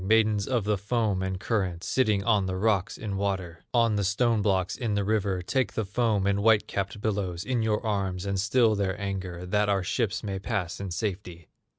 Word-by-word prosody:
Maidens 105 0 +3
of 120 -5 +1
the 105 -1 0
foam 105 -2 0
and 95 -1 -2
current, 95 -6 -1
Sitting 105 -6 +1
on 105 -3 +2
the 95 - -2
rocks 100 -1 +1
in 100 -3 -4
water, 95 -4 -3
On 115 -3 +3
the 100 - +1
stone 110 +3 +2
blocks 95 -3 +1
in 115 -4 -2
the 100 - +1
river, 100 -3 0
Take 130 +6 0
the 110 - -1
foam 105 -1 +1
and 100 0 +1
white 110 0 +4
capped 100 +1 -3
billows 95 -5 -2
In 125 -2 0
your 110 +1 0
arms 95 -3 -1
and 100 -1 -1
still 115 +2 +3
their 100 -3 -1
anger, 95 -3 -4
That 105 +3 +1
our 100 -2 +2
ships 105 +1 -1
may 100 -2 -3
pass 95 -4 -3
in 100 -1 -4
safety! 90 -3 -4
100 Hz, 205 wpm, -27 LUFS, 95-110 Hz, -, white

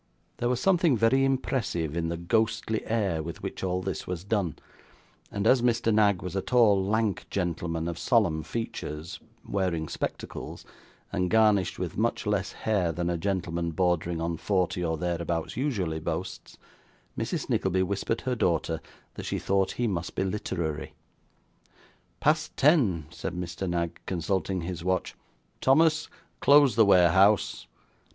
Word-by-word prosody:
There 120 - 0
was 125 -1 0
something 175 - +3
very 115 +5 +3
impressive 115 - -1
in 85 -1 -1
the 85 - -3
ghostly 110 +4 0
air 100 -8 0
with 80 +1 -7
which - - -5
all 90 0 -1
this 95 -4 -4
was 90 -1 -4
done; 100 -5 -1 0.7
and 100 0 -3
as 130 +2 +5
Mr. 120 -2 +2
Knag 105 -3 +3
was 90 0 -5
a 95 - +1
tall 110 -6 +4
lank 110 0 0
gentleman 85 -3 -2
of 85 -1 -4
solemn 100 -11 +2
features, 85 -5 -5 0.3
wearing 90 -5 -1
spectacles, - - -5 0.5
and 90 0 0
garnished 105 -4 +3
with 90 +1 -4
much 115 +1 0
less 105 -2 0
hair 100 -6 0
than 85 +2 -2
a 85 - -1
gentleman 85 -3 -2
bordering 85 -1 0
on 85 0 -2
forty, 90 0 0
or 80 -1 -1
thereabouts, 85 -1 -2
usually 100 - -1
boasts, 85 +4 -5 0.6
Mrs - - -3
Nickleby 95 0 +1
whispered 100 +4 -2
her 130 - -1
daughter 80 -6 0 0.3
that - - -7
she - - -1
thought 95 0 +1
he 120 - -1
must 90 -6 -3
be - - 0
literary. 85 -6 -3 1.2
'Past 155 +1 +1
ten,' 125 - +3
said 90 - -5
Mr. 90 +1 -4
Knag, 85 -1 -2
consulting 95 +1 -1
his 85 0 -5
watch. 95 +1 -1 0.5
'Thomas, 155 +4 +3 0.3
close 140 -2 +6
the 115 - +6
warehouse. 95 - +4
95 Hz, 145 wpm, -27 LUFS, 85-110 Hz, 1.2 s, close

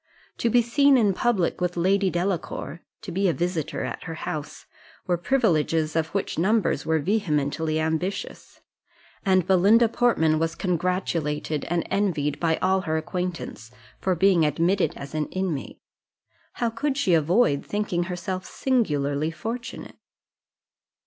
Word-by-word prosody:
To 235 - +1
be 240 +1 +4
seen 280 +3 +4
in 210 -5 +3
public 190 -5 0
with 180 0 -1
Lady 190 +3 +2
Delacour, 175 -3 -3 0.2
to 200 - -6
be 190 +2 +1
a - - +1
visitor 170 -3 -2
at - - -5
her 165 -2 -5
house, 155 -1 -6 0.4
were 180 - +1
privileges 165 - +1
of 160 -1 +1
which 195 -1 -3
numbers 210 +5 +1
were 160 0 +3
vehemently 155 -3 0
ambitious; 160 +5 -3 0.6
and 185 -3 +3
Belinda 200 +5 +5
Portman 160 -10 +2
was 165 0 -1
congratulated 165 -4 -1
and 170 0 -1
envied 175 -8 0
by 165 -1 +2
all 190 +1 +3
her 160 -3 -1
acquaintance, 170 - -4 0.3
for 185 -1 0
being 185 -1 +4
admitted 170 +6 +1
as 140 +1 -8
an 155 -1 -1
inmate. 185 -7 -4 0.7
How 235 -2 -1
could 275 +4 -2
she 195 -11 +2
avoid 165 -1 +3
thinking 205 -4 -1
herself 185 +1 -4
singularly 150 - 0
fortunate? 225 +10 -6
180 Hz, 135 wpm, -25 LUFS, 160-200 Hz, 0.7 s, Belinda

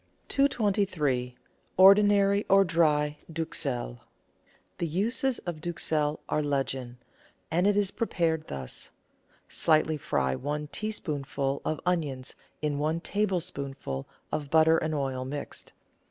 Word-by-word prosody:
223— 190 - +1 0.4
ORDINARY 200 +1 +6
OR 195 0 +7
DRY 150 -3 +2
DUXELLE 140 - -2 0.8
The 170 - 0
uses 230 - 0
of 170 -4 -4
Duxelle 155 -3 -1
are 150 - +1
legion, 135 -4 -2 0.5
and 175 +4 +3
it 205 0 +3
is 200 -2 +2
prepared 165 -9 -1
thus: 65 -2 -5 0.3
— - - -42 0.2
Slightly 155 -1 +3
fry 65 - 0
one 150 - -3
teaspoonful 145 -10 -2
of 155 - -1
onions 150 -8 -1 0.3
in 145 -1 0
one 155 +3 0
tablespoonful 170 - -3 0.2
of 150 -2 -3
butter 160 +1 +5
and 155 0 -2
oil 135 -3 -2
mixed. 140 +2 -6
155 Hz, 115 wpm, -28 LUFS, 140-185 Hz, 0.8 s, OR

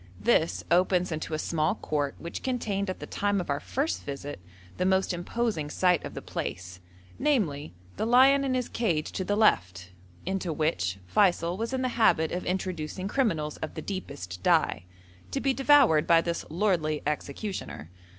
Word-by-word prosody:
This 160 +10 +2
opens 180 0 +3
into 155 0 -3
a - - -1
small 155 +3 0
court 145 -8 -2
which 170 - -6
contained 210 -6 -2
at 185 - -4
the - - -6
time 205 -1 0
of 175 - -3
our 140 - 0
first 280 +5 -2
visit 140 -2 -6 0.4
the - - 0
most 190 0 +2
imposing 175 -3 -2
sight 180 +1 +2
of - - -7
the - - -6
place, 90 +1 -5 0.4
namely 165 - 0 0.2
the 220 - -1
lion 265 +3 +6
in 265 -2 0
his 250 -1 -1
cage 170 -10 -1
to 185 - -3
the 205 +2 0
left, 90 - +2 0.3
into 190 -2 -2
which 150 - -1
Feysul 175 - +2
was 230 +4 -3
in 260 -1 -1
the 255 - +1
habit 160 -7 +4
of 180 - -3
introducing 185 -1 -3
criminals 180 - 0
of 160 - -6
the 155 - -4
deepest 140 - -6
dye, - - +2 0.4
to 275 - -2
be 270 0 +1
devoured 270 - +5
by 170 -1 +6
this 170 0 -2
lordly 165 -4 0
executioner. 150 - -4
180 Hz, 170 wpm, -28 LUFS, 155-215 Hz, 0.4 s, lion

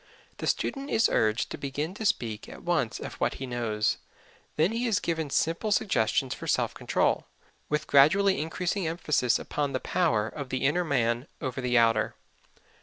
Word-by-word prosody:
The - - -4
student 275 0 -1
is 225 - +3
urged 110 +1 +1
to - - -5
begin 145 +5 -3
to 215 +1 -1
speak 110 - -2
at - - -11
once - - 0
of - - -6
what - - +1
he 135 - -5
knows. 115 -4 -1 0.6
Then 160 +6 +3
he 235 +2 -1
is 210 -4 +2
given 160 -5 -2
simple 165 +9 0
suggestions 135 - +1
for - - -8
self - - +1
control, - - 0 0.4
with 150 0 0
gradually 190 +7 +5
increasing 175 +3 -2
emphasis 150 -6 +1
upon 145 -2 -3
the 130 - 0
power 120 -13 +1
of 140 +2 -7
the 130 +1 -1
inner 165 +6 +2
man 120 -4 0
over 130 -2 -3
the 125 -1 +2
outer. 115 -2 +3
145 Hz, 175 wpm, -28 LUFS, 120-175 Hz, 0.6 s, gradually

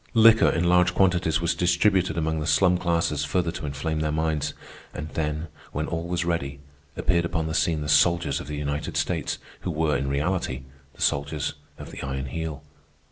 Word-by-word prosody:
Liquor 110 0 +7
in 85 - +1
large 90 0 +4
quantities 90 -4 +2
was 85 0 +1
distributed 90 +1 +2
among 80 -1 0
the 75 - -3
slum 90 +4 +4
classes 85 -4 0
further 85 +3 0
to 75 - -5
inflame 75 +3 -2
their 75 0 0
minds. 75 -1 -1 0.4
And 75 +1 -5
then, 75 +1 -2 0.3
when 75 +2 -1
all 85 +1 -3
was 85 -1 -1
ready, 70 -5 -2 0.4
appeared 85 -2 +2
upon 85 -1 -1
the 80 - -3
scene 80 -1 +1
the 75 - -4
soldiers 75 0 +3
of - - -8
the 75 0 -4
United 75 0 -3
States, - - -1 0.2
who - - -4
were, 80 -2 +1
in 70 - -1
reality, 70 -2 -1 0.3
the - - -14
soldiers 70 +1 0 0.2
of - - -9
the - - -8
Iron 65 -1 -3
Heel. 80 +2 -5
80 Hz, 190 wpm, -25 LUFS, 75-85 Hz, 0.4 s, Liquor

